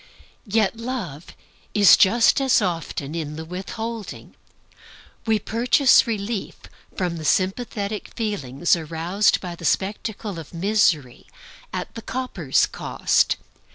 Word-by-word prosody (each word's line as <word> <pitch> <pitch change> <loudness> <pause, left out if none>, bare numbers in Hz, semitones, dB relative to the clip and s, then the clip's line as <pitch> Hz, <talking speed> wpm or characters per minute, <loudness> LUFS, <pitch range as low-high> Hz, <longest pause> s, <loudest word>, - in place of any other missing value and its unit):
Yet 215 +1 +1
Love 225 - -5 0.5
is 205 -2 +8
just 230 +7 +4
as 265 -2 +4
often 165 -6 -3
in 155 -3 -4
the 160 +1 -6
withholding. 215 +5 -6 0.9
We 220 -1 +3
purchase 245 +5 +4
relief 215 -1 -3 0.4
from 175 -2 -1
the 160 - -7
sympathetic 200 +4 -1
feelings 175 - 0
roused 170 +5 +1
by 180 -2 -5
the 170 - -12
spectacle 200 +1 -2
of 165 +2 -11
misery, 170 - +1 0.4
at - - -5
the 230 - -7
copper's 225 - 0
cost. - - +1
195 Hz, 115 wpm, -23 LUFS, 170-225 Hz, 0.9 s, is